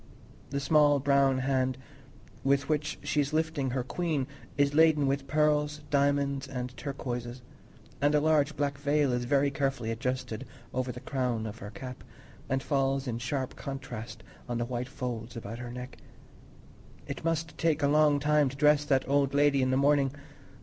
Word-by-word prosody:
The 140 - -2
small 145 0 +4
brown 140 -1 +3
hand 130 -1 0 0.7
with 140 +1 +2
which 150 0 -1
she 145 +1 +1
is 145 +2 -3
lifting 160 -4 0
her 125 0 -1
queen 155 0 -1 0.3
is 140 0 +3
laden 155 -2 +5
with 135 0 -1
pearls, 150 0 +1
diamonds, 140 -1 +1
and 125 -1 -5
turquoises; 120 -1 -5 0.6
and 145 +1 +3
a - - +5
large 150 -1 +2
black 140 -1 -1
veil 145 -2 +2
is 120 0 -1
very 140 +2 +2
carefully 135 -5 -1
adjusted 125 0 -3 0.3
over 130 0 -1
the 125 - -9
crown 125 -4 -1
of 110 +1 -6
her 100 - -7
cap, 125 +4 -8 0.5
and 135 0 0
falls 135 -1 0
in 115 -1 -2
sharp 130 +1 -3
contrast 120 -5 -7 0.3
on 120 - -1
the 120 - -1
white 125 +1 -4
folds 120 -3 -5
about 115 +1 -6
her 120 0 -6
neck. 125 +1 -8 1.1
It - - -6
must 165 -1 -1
take 160 -3 +1
a - - +5
long 150 0 +4
time 150 -1 +3
to 135 - -9
dress 150 0 +4
that 135 -2 +2
old 140 0 +2
lady 145 -1 +4
in 130 - +2
the 130 - +2
morning! 140 -1 +3
140 Hz, 170 wpm, -29 LUFS, 125-145 Hz, 1.1 s, laden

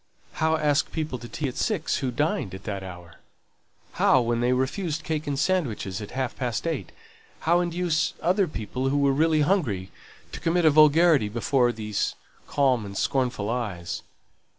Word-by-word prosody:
How 160 0 +1
ask 150 -2 +1
people 155 -6 -3
to 120 0 -9
tea 150 - -3
at 125 - -5
six, - - 0
who 135 -2 -1
dined 145 - -1
at 95 - -10
that 100 -1 -4
hour? 90 -3 -10 0.7
How, 130 - +4
when 120 -1 0
they 120 +1 +2
refused 150 +5 -1
cake 155 -4 -3
and 140 -1 -1
sandwiches 120 - -1
at 105 - -7
half 130 -2 -2
past 120 -1 -2
eight, 165 - -3 0.5
how 170 +2 +3
induce 175 -2 0
other 185 +2 +2
people 130 0 -3
who 140 - +1
were 140 -1 +3
really 155 +2 +3
hungry 140 - 0 0.4
to - - -7
commit 170 +1 +1
a 155 - +7
vulgarity 155 -4 +5
before 120 +3 +2
those 105 -3 -2 0.3
calm 130 -5 +2
and 100 -1 -7
scornful 125 -6 0
eyes? 105 -8 -3
135 Hz, 170 wpm, -25 LUFS, 115-160 Hz, 0.7 s, a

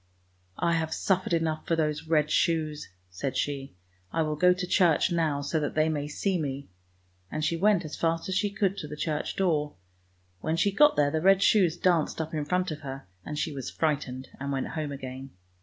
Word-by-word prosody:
" 90 0 -39
I 170 -1 +1
have 160 -1 -1
suffered 190 -1 0
enough 160 -2 0
for 165 - +2
those 155 -1 -1
red 155 -1 +2
shoes! 155 -3 0
" - - -39
said 125 +9 -3
she. 140 -6 -3 0.2
" 90 0 -37
I 165 - +1
will 155 -1 -1
go 180 +4 +5
to 180 0 -1
church 180 -1 +3
now, 160 -4 +1
so 145 +3 -1
that 145 - -3
they 155 0 +3
may 145 -2 -2
see 180 +5 -1
me! 140 -1 -4 0.3
" 90 0 -38
and 155 0 -1
she 170 - +1
went 195 0 +3
as 155 - -6
fast 165 0 0
as 190 - -2
she 205 +2 +1
could 200 -1 0
to 150 - -5
the 150 +1 -7
church 150 -1 -2
door. 155 - 0 0.6
When 160 - -1
she 200 +4 +2
got 295 +8 +5
there, 145 -1 +3
the 160 0 0
red 195 +2 +5
shoes 180 -6 +4
danced 170 -4 +1
up 160 0 -3
in 150 -2 -1
front 180 +3 0
of 155 - -5
her, 135 -1 -7 0.2
and 150 - -5
she 155 - -1
was 135 -3 -5
frightened 140 -4 -2
and 140 +1 -3
went 135 -1 -2
home 155 -2 -3
again. 130 -2 -7
155 Hz, 225 wpm, -28 LUFS, 145-170 Hz, 0.6 s, go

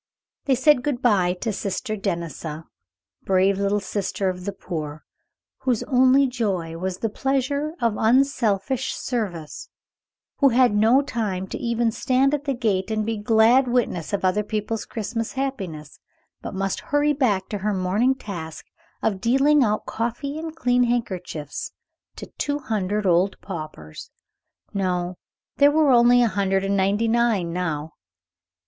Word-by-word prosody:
They 270 - +3
said 260 +1 +4
good 265 -2 -2
by 190 -7 +3
to 225 -3 -1
Sister 205 +3 -3
Denisa, 170 -5 -4 0.6
brave 190 +1 +2
Little 200 +1 +1
Sister 195 -1 -2
of 180 0 -6
the 200 - -2
Poor, 155 -5 -6 0.6
whose 245 -4 0
only 260 +1 +4
joy 200 -10 -2
was 185 0 -3
the 225 - -1
pleasure 275 +6 -1
of 230 -3 0
unselfish 245 -1 +1
service; 185 - -4 0.7
who 280 - +5
had 250 -2 +4
no 225 +6 +4
time 205 -8 -2
to - - -4
even 235 -1 0
stand 260 +4 +1
at 295 0 -2
the 275 -2 0
gate 210 -5 0
and 215 -1 -1
be 225 - -1
a - - -8
glad 225 +4 +4
witness 240 -9 -1
of 200 -2 -1
other 185 +3 +2
people's 215 +1 -3
Christmas 225 +1 -4
happiness, 190 - -5 0.4
but - - -6
must 195 0 -1
hurry 290 +1 +3
back 215 -9 +1
to 205 - -3
her 210 +2 -1
morning 200 +7 +1
task 170 -10 -7 0.4
of 195 -3 0
dealing 275 +5 +4
out 215 -2 0
coffee 240 +6 -3
and 320 0 -6
clean 250 -5 +2
handkerchiefs 185 - -3 0.4
to - - -8
two 285 0 0
hundred 210 -5 -2
old 180 +2 +2
paupers. 155 - -8 0.6
No, 180 -2 -2 0.4
there 285 0 +6
were 300 -1 +3
only 245 0 +6
a - - +4
hundred 195 -1 0
and 195 0 0
ninety 200 +4 +1
nine 225 -7 +1
now. 160 -4 -3
215 Hz, 150 wpm, -23 LUFS, 190-255 Hz, 0.7 s, there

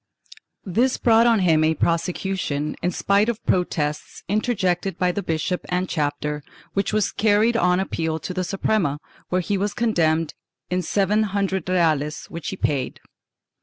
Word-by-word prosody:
This 235 +8 +1
brought 230 0 +4
on 230 -4 +4
him 160 -4 +4
a 160 +1 +2
prosecution, 170 -3 -1
in 180 - +1
spite 200 +4 +2
of 235 - -1
protests 150 -4 -1
interjected 195 -3 0
by 180 -1 +2
the 200 - -3
bishop 180 +2 -2
and 180 +1 0
chapter, 150 -1 -2 0.3
which 195 0 0
was 215 -1 +1
carried 215 +2 +3
on 180 -5 +3
appeal 160 -4 -1
to 170 +4 -5
the 185 0 -1
Suprema, 185 -4 0 0.3
where 185 0 +1
he 200 +2 -1
was 205 +1 -1
condemned 165 -9 +1 0.4
in 180 0 +1
seven 200 +4 +1 0.2
hundred 190 -3 -1
reales 155 -4 +1
which 170 -1 -6
he 190 - -5
paid. 135 -7 -1
180 Hz, 155 wpm, -23 LUFS, 160-205 Hz, 0.4 s, brought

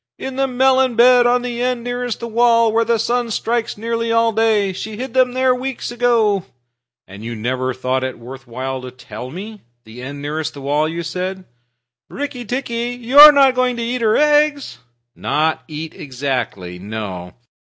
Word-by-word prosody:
"In 265 -1 -6
the 270 0 +1
melon 260 0 +2
bed, 245 +1 +6
on 245 0 +2
the 240 -1 -4
end 250 -1 -1
nearest 245 -1 -4
the 235 - -4
wall, 230 0 +3
where 230 +1 +3
the 230 0 +1
sun 240 +2 -1
strikes 230 +1 -2
nearly 230 +1 -2
all 230 0 +3
day. 215 -3 +1
She 210 +3 -7
hid 255 0 -6
them 255 -1 +3
there 260 0 +2
weeks 255 -1 -4
ago." 230 -5 +2 0.6
"And 100 +2 -11
you 115 +1 -5
never 130 +3 -2
thought 130 +1 -2
it 130 - -4
worth 125 +2 -11
while 130 +2 -5
to 130 - -8
tell 125 -1 -9
me? 205 +7 -9 0.2
The 115 +3 -12
end 140 +3 -7
nearest 150 +2 -4
the 140 - -9
wall, 145 +3 0
you 170 +1 -4
said?" 185 +3 -4 0.6
"Rikki 280 -4 -5
tikki, 240 0 -3
you 250 +4 +3
are 300 +1 +13
not 275 -2 +4
going 255 -1 0
to 235 - -4
eat 240 +1 -2
her 220 -1 +3
eggs?" 295 - +2 0.4
"Not 155 +1 -1
eat 155 +1 -7
exactly; 125 -10 -4
no. 95 -3 -6
225 Hz, 185 wpm, -18 LUFS, -, 0.6 s, are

